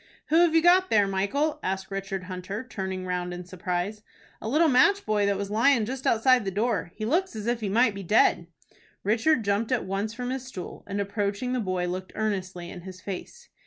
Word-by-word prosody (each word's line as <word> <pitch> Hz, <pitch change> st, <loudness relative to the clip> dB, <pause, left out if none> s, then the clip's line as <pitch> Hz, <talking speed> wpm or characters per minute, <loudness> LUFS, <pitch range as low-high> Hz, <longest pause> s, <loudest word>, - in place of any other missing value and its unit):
"Who 315 Hz, -, +4 dB
have 340 Hz, -1 st, +5 dB
you 325 Hz, -, +5 dB
got 370 Hz, +2 st, +5 dB
there, 205 Hz, -2 st, +4 dB
Michael?" 200 Hz, +11 st, 0 dB
asked 190 Hz, +1 st, -3 dB
Richard 195 Hz, -1 st, -4 dB
Hunter, 185 Hz, +5 st, -6 dB
turning 190 Hz, -4 st, -4 dB
round 180 Hz, -1 st, -2 dB
in 180 Hz, 0 st, -8 dB
surprise. 180 Hz, +3 st, -3 dB, 0.4 s
"A -, -, -5 dB
little 315 Hz, +6 st, +4 dB
match 390 Hz, +10 st, +4 dB
boy 210 Hz, -1 st, +2 dB
that 200 Hz, -1 st, +1 dB
was 200 Hz, 0 st, -4 dB
lyin' 230 Hz, +1 st, +4 dB
just 260 Hz, +3 st, -4 dB
outside 245 Hz, +1 st, +4 dB
the 195 Hz, -, -2 dB
door. 210 Hz, -1 st, -1 dB
He 215 Hz, -, -4 dB
looks 340 Hz, -, 0 dB
as 215 Hz, -1 st, -5 dB
if 240 Hz, 0 st, 0 dB
he 205 Hz, -, -2 dB
might 230 Hz, +2 st, +3 dB
be 200 Hz, -, -6 dB
dead." 180 Hz, -3 st, +3 dB, 0.6 s
Richard 225 Hz, +6 st, +2 dB
jumped 205 Hz, +4 st, 0 dB
at 250 Hz, -, +1 dB
once 200 Hz, +4 st, -3 dB
from 250 Hz, 0 st, -3 dB
his 260 Hz, -1 st, -3 dB
stool, 220 Hz, -9 st, -8 dB
and, 200 Hz, 0 st, -3 dB
approaching 200 Hz, +4 st, -2 dB
the 255 Hz, -, 0 dB
boy, 185 Hz, -4 st, -1 dB
looked 185 Hz, +1 st, -5 dB
earnestly 190 Hz, -5 st, -3 dB
in 180 Hz, -, -8 dB
his 185 Hz, +1 st, -10 dB
face. 205 Hz, -, -8 dB
205 Hz, 210 wpm, -26 LUFS, 190-250 Hz, 0.6 s, have